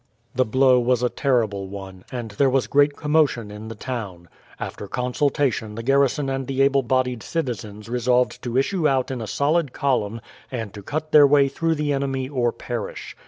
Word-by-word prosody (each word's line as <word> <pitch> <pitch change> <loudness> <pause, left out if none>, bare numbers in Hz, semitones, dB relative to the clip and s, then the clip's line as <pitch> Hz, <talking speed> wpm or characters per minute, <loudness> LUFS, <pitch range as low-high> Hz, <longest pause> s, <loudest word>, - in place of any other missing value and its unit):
The 130 0 +2
blow 130 +2 +4
was 125 0 +1
a 125 - +3
terrible 110 -9 0
one, 95 -1 -9
and 120 -3 -5
there 135 +7 +2
was 130 -1 +2
great 145 0 +3
commotion 150 -8 +1
in 105 +1 -8
the 115 - -7
town. 105 -8 -6 0.3
After 100 - -6
consultation 125 -2 -1
the 115 - -5
garrison 140 +2 +2
and 135 -1 -2
the 135 0 +1
able 140 0 +3
bodied 125 -1 0
citizens 110 - -4
resolved 125 +1 +1
to 120 0 -2
issue 155 +4 +2
out 135 -1 0
in 125 -3 -4
a 110 - -5
solid 145 +5 +1
column, 115 -5 0 0.3
and 115 -6 -4
to 105 - -8
cut 155 +8 -4
their 145 -2 +8
way 140 -1 +5
through 165 +4 0
the 150 -1 0
enemy 135 -1 -1
or 125 -4 0
perish. 120 -2 -6
125 Hz, 185 wpm, -23 LUFS, 115-140 Hz, 0.3 s, their